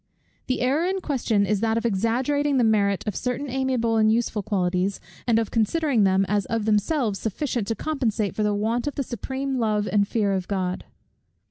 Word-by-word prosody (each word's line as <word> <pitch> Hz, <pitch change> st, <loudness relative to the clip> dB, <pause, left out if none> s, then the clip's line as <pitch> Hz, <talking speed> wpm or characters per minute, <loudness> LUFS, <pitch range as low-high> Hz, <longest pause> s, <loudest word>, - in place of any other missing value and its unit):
The 255 Hz, -, -1 dB
error 270 Hz, +6 st, +2 dB
in 380 Hz, +1 st, -1 dB
question 240 Hz, -, 0 dB
is 210 Hz, 0 st, 0 dB
that 225 Hz, +1 st, +1 dB
of 230 Hz, -, -2 dB
exaggerating 255 Hz, +7 st, +1 dB
the 250 Hz, -, +3 dB
merit 200 Hz, -3 st, +2 dB
of 210 Hz, -4 st, -3 dB
certain 250 Hz, +3 st, -2 dB
amiable 255 Hz, -4 st, 0 dB
and 215 Hz, 0 st, +4 dB
useful 225 Hz, -2 st, 0 dB
qualities, 185 Hz, -1 st, 0 dB, 0.3 s
and 230 Hz, -2 st, +4 dB
of 225 Hz, -2 st, -1 dB
considering 235 Hz, 0 st, +2 dB
them 190 Hz, 0 st, +3 dB
as 205 Hz, 0 st, 0 dB
of 225 Hz, -1 st, -1 dB
themselves 215 Hz, -, +1 dB
sufficient 230 Hz, 0 st, -2 dB
to 225 Hz, -, -1 dB
compensate 225 Hz, -7 st, -1 dB
for -, -, -1 dB
the 210 Hz, -1 st, +1 dB
want 225 Hz, +5 st, -1 dB
of 290 Hz, -, -3 dB
the 280 Hz, -, -1 dB
supreme 265 Hz, +3 st, -3 dB
love 210 Hz, -2 st, 0 dB
and 200 Hz, -1 st, +3 dB
fear 205 Hz, -3 st, 0 dB
of 185 Hz, -2 st, -2 dB
God. 185 Hz, -2 st, -2 dB
225 Hz, 195 wpm, -24 LUFS, 205-255 Hz, 0.3 s, and